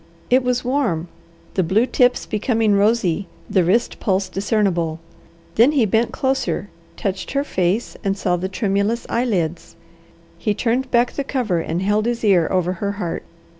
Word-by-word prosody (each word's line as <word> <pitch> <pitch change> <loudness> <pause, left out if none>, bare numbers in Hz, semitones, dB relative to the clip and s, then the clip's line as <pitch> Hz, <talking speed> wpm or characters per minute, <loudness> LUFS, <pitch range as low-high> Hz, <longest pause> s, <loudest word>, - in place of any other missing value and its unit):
It 255 +1 +5
was 250 0 0
warm, 225 - 0 0.4
the 190 - +2
blue 195 +7 +2
tips 250 -1 +2
becoming 220 -1 +1
rosy, 200 -3 +2 0.2
the 185 - +2
wrist 220 +8 +1
pulse 190 -2 0
discernible. 190 -5 0 0.6
Then 245 +7 +6
he 265 -6 +3
bent 220 +3 +1
closer, 265 -6 -1 0.3
touched 195 +3 -3
her 280 0 +1
face, 190 -3 -1
and 195 -1 0
saw 180 -2 +1
the 185 +2 -3
tremulous 200 +3 0
eyelids. 180 -9 -1 0.6
He 210 -3 0
turned 245 +4 0
back 240 0 +3
the 280 - -3
cover, 245 -10 -1
and 165 +2 -2
held 210 +3 +1
his 240 -1 -2
ear 185 -6 +4
over 180 -1 +1
her 200 -1 -1
heart. 180 -5 -4
205 Hz, 160 wpm, -21 LUFS, 185-240 Hz, 0.6 s, Then